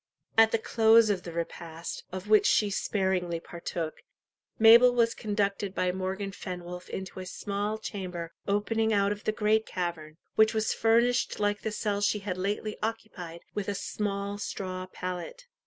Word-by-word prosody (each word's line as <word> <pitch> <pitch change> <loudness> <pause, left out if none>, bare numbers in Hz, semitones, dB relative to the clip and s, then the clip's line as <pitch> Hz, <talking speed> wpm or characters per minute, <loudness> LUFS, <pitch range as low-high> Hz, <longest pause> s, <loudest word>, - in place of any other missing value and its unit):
At 225 0 +6
the - - +3
close 225 -1 +5
of 190 -3 -1
the 175 - -7
repast, 165 0 -5
of 185 +2 -6
which 215 0 +5
she 210 -1 +3
sparingly 190 -4 0
partook, 170 -1 -5 0.6
Mabel 235 +2 +8
was 230 -1 +3
conducted 200 -2 -1
by 180 0 +1
Morgan 190 +2 -3
Fenwolf 180 -2 -7
into 190 0 -6
a 185 - -6
small 205 +3 -3
chamber 180 -6 -5
opening 220 +2 +1
out 200 -1 +3
of 205 0 -5
the - - +2
great 215 +1 +1
cavern, 165 -4 -4 0.2
which 220 +1 +4
was 220 0 +1
furnished 235 +2 +2
like 205 0 0
the 220 - -2
cell 210 -1 -1
she 205 +1 +2
had 195 -3 -4
lately 205 +2 -2
occupied, 200 -7 -5
with 205 -2 -3
a 200 - -1
small 200 0 -3
straw 185 -2 -4
pallet. 185 - -6
200 Hz, 160 wpm, -29 LUFS, 185-220 Hz, 0.6 s, Mabel